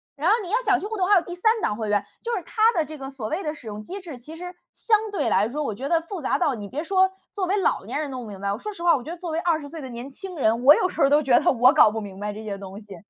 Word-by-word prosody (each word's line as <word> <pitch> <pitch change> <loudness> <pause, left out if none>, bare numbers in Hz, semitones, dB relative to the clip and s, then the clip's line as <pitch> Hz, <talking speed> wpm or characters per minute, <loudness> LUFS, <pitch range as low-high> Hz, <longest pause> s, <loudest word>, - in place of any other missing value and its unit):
然 305 +5 +1
后 425 - +6
你 365 - -7
要 440 - +2
想 400 -5 +3
去 - - -6
互 440 +1 -4
动， 375 -2 0
还 415 - +7
有 365 - +5
第 350 0 -7
3 440 +5 +2
档 210 - 0
会 220 -1 -4
员。 205 -1 +1 0.2
就 475 0 -2
是 - - -5
它 445 +1 +3
的 330 -8 0
这 310 +1 -9
个 270 -1 -7
所 265 -6 -6
谓 330 - -3
的 300 - -2
使 275 -7 -12
用 210 0 -6
机 380 - -7
制， 335 -8 -9
其 255 +6 -11
实 360 +1 -8 0.2
相 440 -2 +2
对 405 - -1
来 205 +3 +2
说， 295 +5 -3
我 245 -8 -2
觉 270 +6 -5
得 335 - +3
复 335 +2 -7
杂 265 - +1
到， 295 -7 +1
你 205 -3 -7
别 285 +7 -3
说 380 +1 +3 0.2
作 395 -3 -1
为 395 +3 +1
老 390 - +1
年 - - -4
人 305 -2 -3
弄 255 -1 -5
不 220 - -9
明 200 -2 -9
白， 200 0 -1
我 - - -4
说 425 - -6
实 395 - -11
话 345 0 +5
我 255 - -4
觉 310 - -7
得 350 - -6
作 345 -1 -5
为 320 - -1
20 325 -4 0
岁 320 +2 -8
的 265 - -7
年 240 +2 -7
轻 365 +5 -9
人， 230 -2 +1
我 285 +3 +10
有 365 - +2
时 - - -5
候 275 - +5
都 295 +1 +5
觉 260 -4 +4
得 - - +3
我 255 +2 +5
搞 295 -8 +6
不 220 - -3
明 200 -3 -8
白 210 +1 -3
这 215 +1 -8
些 200 -2 -4
东 195 0 -9
西， 205 -2 -11
300 Hz, 370 characters per minute, -24 LUFS, 225-360 Hz, 0.2 s, 我